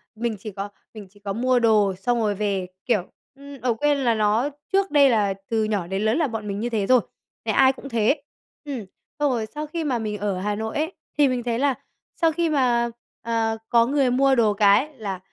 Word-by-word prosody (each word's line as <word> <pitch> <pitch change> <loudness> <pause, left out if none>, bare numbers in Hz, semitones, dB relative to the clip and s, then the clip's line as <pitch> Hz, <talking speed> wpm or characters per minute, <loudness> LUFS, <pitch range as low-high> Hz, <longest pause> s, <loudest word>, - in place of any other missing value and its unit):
mình 230 0 -2
chỉ 215 +2 -7
có 200 +1 -5 0.2
mình 210 -3 -10
chỉ 205 +2 -22
có 200 -1 -4
mua 250 +3 +2
đồ 215 -4 +3
xong 235 +6 0
rồi 210 -2 +1
về, 195 -2 -1 0.2
kiểu, 215 -8 0 0.2
ừm, 280 -1 -12
ở 245 -1 +1
quên 290 +5 +1
là 245 -4 +2
nó 215 +5 +2 0.2
trước 390 0 +2
đây 285 -2 +6
là 210 -5 +2 0.2
từ 225 -1 +1
nhỏ 205 -5 -1
đến 195 +2 -2
lớn 220 +4 +2
là 320 -3 +2
bọn 225 -4 -5
mình 200 0 -3
như 235 +3 -2
thế 210 -4 -1
rồi, 255 -2 +5 0.4
nhà - - 0
ai 265 0 +5
cũng 275 +1 -10
thế. 235 +5 +1 0.4
Ừm, 265 -7 -5 0.3
xong 290 -2 +2
rồi 230 -3 -1
sau 300 +1 -4
khi 330 +2 -4
mà 260 -6 0
mình 210 -2 -3
ở 200 -2 -2
Hà 205 +2 -1
Nội 220 +1 -4
ấy, 320 +5 -1 0.2
thì 290 -1 +5
mình 250 -2 -1
thấy 235 -1 -1
là 275 -1 +2 0.4
sau 330 -1 +2
khi 335 +1 0
mà, 245 -5 +2 0.3
ờ, 225 -1 -1
có 235 -1 +5
người 270 0 +2
mua 270 +2 +4
đồ 220 -4 +3
cái 205 +9 +3
là 200 -5 -4
230 Hz, 230 wpm, -23 LUFS, 210-270 Hz, 0.4 s, đây